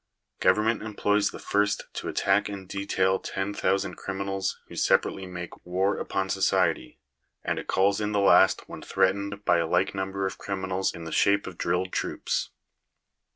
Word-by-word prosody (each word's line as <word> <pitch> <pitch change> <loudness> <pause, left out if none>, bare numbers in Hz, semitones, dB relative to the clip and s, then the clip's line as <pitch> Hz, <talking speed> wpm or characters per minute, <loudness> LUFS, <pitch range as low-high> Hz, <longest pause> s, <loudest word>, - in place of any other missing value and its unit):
Government 110 +2 +3
employs 105 -1 +1
the - - -8
first 105 0 0
to - - -5
attack 100 +1 +1
in 100 -2 -7
detail 95 0 0
ten 95 +1 -3
thousand 100 -1 0
criminals 95 0 -3
who - - -11
separately 95 -1 +1
make 90 -1 -8
war 95 +3 0
upon 95 0 -2
society; 95 -8 +1 0.5
and - - -1
it - - -8
calls 100 +2 +2
in 105 0 -1
the 105 - +1
last 95 -1 +5
when - - -9
threatened 100 +2 0
by 85 - +4
a 85 - 0
like 90 +3 +1
number 95 0 -2
of 95 - -4
criminals 95 -1 -2
in 85 - -9
the 80 - -7
shape 100 0 +3
of 95 - -7
drilled 90 +2 0
troops. - - -2
95 Hz, 165 wpm, -27 LUFS, 95-100 Hz, 0.5 s, last